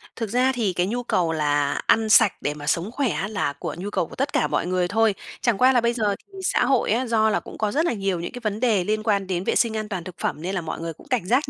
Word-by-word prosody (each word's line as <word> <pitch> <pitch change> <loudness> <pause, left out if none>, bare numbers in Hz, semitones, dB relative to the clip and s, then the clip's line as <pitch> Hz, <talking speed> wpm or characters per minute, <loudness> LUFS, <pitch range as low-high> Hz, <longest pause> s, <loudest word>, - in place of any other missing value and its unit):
Thực 225 -2 -4
ra 250 +4 +2
thì 225 -7 -1
cái 180 +1 0
nhu 245 +4 -2
cầu 175 -8 +1
là 145 -2 +1
ăn 220 -1 +3
sạch 215 -1 +6
để 145 - -1
mà 145 -1 -9
sống 170 +7 0
khỏe 270 0 0
á 195 - -2
là 200 -9 -2
của - - -6
nhu 190 +4 -4
cầu 170 - -1
của - - -12
tất 275 +2 -2
cả - - +2
mọi - - -1
người 180 -1 +1
thôi. 220 +2 +2 0.3
Chẳng 235 -5 +2
qua 255 +3 +5
là 245 - +4
bây 235 +1 +1
giờ 210 -4 0
thì 390 -1 -14
xã 355 - +2
hội 260 -4 +2
á, 240 +4 +1
do 220 -1 +3
là 215 - +1
cũng - - -11
có 215 -2 0
rất 310 +7 +1
là 340 - +1
nhiều 195 -4 -1
những 170 - -5
cái 245 - -7
vấn 215 -1 -2
đề 220 -6 +2
liên 215 +3 -1
quan 200 -3 +1
đến 180 -1 -2
vệ - - 0
sinh 230 -2 +2
an 215 -1 -4
toàn 185 -5 -4
thực 180 0 -9
phẩm, 150 - -2
nên 185 +4 -3
là 185 - -1
mọi 160 -1 -5
người 165 0 -4
cũng - - -18
cảnh 255 -9 0
giác 250 +9 +1
210 Hz, 315 wpm, -23 LUFS, 180-235 Hz, 0.3 s, sạch